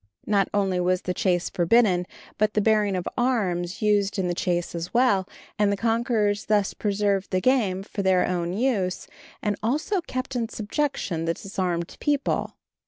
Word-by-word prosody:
Not 200 -3 +2
only 195 -3 +1
was 180 0 +1
the 180 - -1
chase 180 -1 +1
forbidden, 180 -1 +3 0.3
but 215 0 +1
the - - +4
bearing 210 -2 +2
of 180 - -3
arms 190 -8 0
used 205 -1 +2
in 190 -2 0
the 175 - 0
chase 175 0 -1
as 170 0 -5
well, 205 -7 +3 0.3
and 205 -1 +3
the 200 - 0
conquerors 225 -2 +1
thus 205 -2 +1
preserved 200 -1 0
the 185 - +1
game 200 -5 +1
for 200 - -5
their 190 -1 +3
own 175 -1 -1
use, 205 -5 0 0.4
and 210 -1 0
also 305 - 0
kept 255 -4 -5
in 230 -2 -1
subjection 210 - -2
the 165 0 0
disarmed 180 -3 -3
people. 290 -1 0
200 Hz, 170 wpm, -25 LUFS, 180-225 Hz, 0.4 s, the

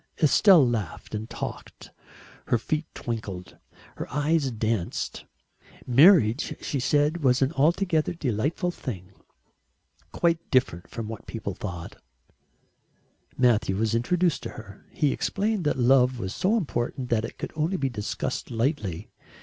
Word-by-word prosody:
Estelle 160 -1 +6
laughed 110 -8 -4
and 110 +1 -4
talked, - - -7 0.6
her - - +3
feet 155 +7 -2
twinkled, 100 -6 -5 0.4
her - - -6
eyes 150 0 +1
danced. 110 -5 -2 0.6
Marriage, 135 - +5
she 140 - -3
said, 145 +5 +2
was 130 0 +4
an 135 - +1
altogether 165 +2 +1
delightful 145 - -1
thing, 100 - -7 1.0
quite 170 -1 +1
different 125 -10 +1
from 115 -2 -5
what 110 -1 -8
people 110 -4 -4
thought 85 -3 -7 1.4
Matthew 115 -6 +3
was 110 +1 0
introduced 165 +7 +1
to - - -5
her. 105 -2 -12
He 150 -3 +1
explained 205 -3 -1
that 150 - +1
love 125 0 +4
was 95 -4 -4
so 210 +5 +1
important 125 - -3
that 110 -2 +2
it - - -7
could - - -5
only 160 +5 0
be 140 - 0
discussed 105 -4 -4
lightly. 115 - -2
125 Hz, 135 wpm, -26 LUFS, 110-155 Hz, 1.4 s, Estelle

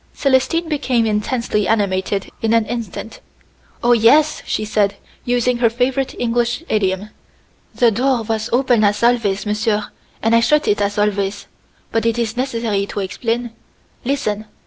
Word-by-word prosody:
Célestine 280 +5 +1
became 260 -6 0
intensely 210 -1 -1
animated 195 -2 0
in 225 0 +1
an 230 -1 +3
instant. 225 -2 -6 0.6
"Oh, 240 - +4
yes," 290 +7 +4
she 215 - -1
said, 205 -2 +1 0.3
using 245 0 +1
her 235 -2 +4
favorite 255 +3 -1
English 240 +4 0
idiom. 200 0 0 0.6
"The 240 -2 +4
door 250 +2 +1
was 220 0 -2
open 245 -3 +3
as 205 +2 +1
always, 230 -5 +2
monsieur, 210 0 -1 0.3
and 225 +1 +2
I - - +6
shut 300 +6 +2
it 210 0 +2
as 205 0 -1
always. 205 -1 0 0.5
But 225 0 +1
it 230 0 0
is 230 -1 -1
necessary 230 -6 -1
to - - -5
explain. 230 +5 -2 0.5
Listen! 220 -6 -2
225 Hz, 145 wpm, -19 LUFS, 210-245 Hz, 0.6 s, I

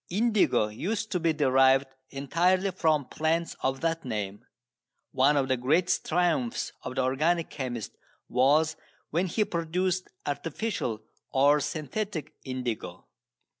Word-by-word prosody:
Indigo 210 - +2
used 215 - -3
to 180 - +1
be 165 -1 +2
derived 135 -2 +4 0.2
entirely 180 +8 +1
from 160 -5 +1
plants 165 +4 -1
of 135 0 -1
that 165 0 0
name. 105 -4 -4 0.7
One 140 +3 +4
of 135 -1 +2
the 130 - +1
greatest 155 +9 +1
triumphs 165 -8 0
of 130 - -6
the 130 - +1
organic 155 +6 +1
chemist 130 -6 -4 0.4
was 150 +5 +3 0.4
when 175 +4 +1
he 210 +4 +1
produced 180 +2 -1 0.2
artificial 145 - -3 0.3
or 145 +2 +4
synthetic 155 +2 -4
indigo. 125 -4 -4
155 Hz, 125 wpm, -28 LUFS, 130-175 Hz, 0.7 s, derived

